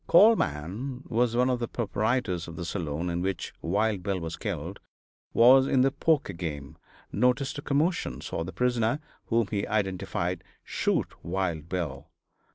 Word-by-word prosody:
Carl 215 +7 +8
Mann 105 - -3
was 120 0 +2
one 125 +1 +3
of 125 -1 +1
the 120 - -2
proprietors 110 -5 -1
of 85 - -8
the 85 - -5
saloon 85 -2 -3
in 85 0 -1
which 95 -1 -2
Wild 100 +3 +1
Bill 95 -1 -1
was 80 -1 -4
killed; - - -4 0.5
was 130 +3 +7
in 130 - +3
the 135 +1 +4
poker 145 -6 +1
game; 80 -4 -5 0.4
noticed 125 +5 +1
a - - -5
commotion; 150 +6 0
saw 80 - -3
the 90 - -6
prisoner 120 - +1 0.3
(whom 115 -1 +2
he 100 -2 -1
identified) 95 -4 -1 0.2
shoot - - 0
Wild 85 -3 -2
Bill. 75 -7 -3
105 Hz, 160 wpm, -28 LUFS, 85-125 Hz, 0.5 s, Carl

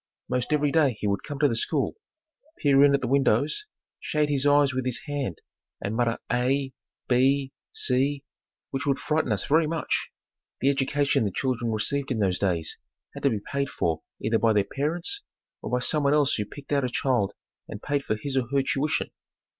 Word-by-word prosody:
Most 125 +2 -1
every 150 -1 +2
day 145 -8 +3
he - - -4
would 100 -1 0
come 145 - -6
to 145 +1 +4
the 115 - 0
school, 140 +5 0 0.6
peer 140 -1 +5
in 140 -1 +6
at 140 - -1
the 125 - -1
windows, 140 - +2 0.3
shade 150 -1 0
his 145 -1 +1
eyes 145 -2 +4
with 130 0 -1
his 125 -1 -2
hand 140 - -3 0.4
and 100 +3 -3
mutter 115 -1 +1
"A" 130 +2 +1 0.3
"B" 135 +2 +2 0.2
"C", 135 +2 +1 0.5
which 135 +1 -3
would 140 -1 +2
frighten 150 -5 0
us 100 -2 0
very 155 +2 +3
much. 165 0 -1 0.5
The 135 - +3
education 140 -1 +1
the 105 - +1
children 120 0 -1
received 135 +6 -1
in 125 - -1
those 95 -4 +1
days 85 -5 -1 0.3
had - - -8
to 140 - +3
be 110 -5 -2
paid 140 0 0
for 80 - -1 0.2
either 110 +1 +1
by 115 -1 +3
their 105 -1 +3
parents 165 - -2 0.4
or - - -5
by 125 - +1
someone 140 +3 +2
else 145 -2 +3
who 105 - 0
picked 140 +7 -12
out 140 -2 +2
a 125 - 0
child 120 -6 0 0.3
and 105 - -7
paid 145 +3 -1
for 110 - -1
his 135 +5 -4
or 130 -3 +1
her 140 -1 +2
tuition. 140 +3 -1
135 Hz, 195 wpm, -26 LUFS, 115-145 Hz, 0.6 s, in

